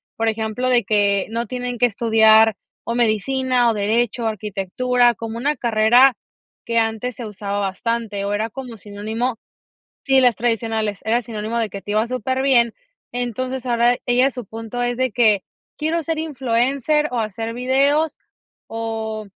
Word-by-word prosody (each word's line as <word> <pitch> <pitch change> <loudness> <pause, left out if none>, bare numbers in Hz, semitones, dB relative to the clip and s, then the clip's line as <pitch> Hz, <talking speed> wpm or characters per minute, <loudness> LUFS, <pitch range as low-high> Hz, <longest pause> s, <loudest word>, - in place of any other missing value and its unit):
por 225 0 -1
ejemplo, 220 +3 -2
de 245 -2 +3
que 200 -2 +2
no 230 +1 -2
tienen 245 +1 -4
que 245 - +4
estudiar 220 -1 +4 0.3
o 235 - -2
medicina 245 +2 +1
o - - +1
derecho, 225 +3 0
arquitectura, 220 +4 +1
como 225 0 -6
una 290 +5 0
carrera 240 +3 +4 0.5
que 230 -1 +1
antes 225 +2 -1
se 240 - -7
usaba 205 -1 -4
bastante, 205 +1 -2
o 200 - -2
era 220 +2 -1
como 245 -1 -8
sinónimo, 215 +4 -4 0.7
sí, 270 -1 +4
las 245 -3 +4
tradicionales, 225 -3 -1
era 235 +2 +1
sinónimo 220 +1 -4
de 220 -3 -2
que 200 0 -7
te 205 - -5
iba 215 +2 +2
superbién. 255 -1 +2 0.4
Entonces, 255 +1 -3
ahora, 240 0 +3
ellas 250 +2 +3
su 250 -3 -6
punto 225 +3 -5
es 245 0 -1
de 255 -1 0
que 215 -5 +3 0.3
quiero 320 +2 -1
ser 325 0 -2
influencer 275 +1 0
o 240 - -1
hacer 225 +2 -4
videos 280 +5 +1 0.5
o 220 -1 -4
235 Hz, 155 wpm, -21 LUFS, 220-250 Hz, 0.7 s, que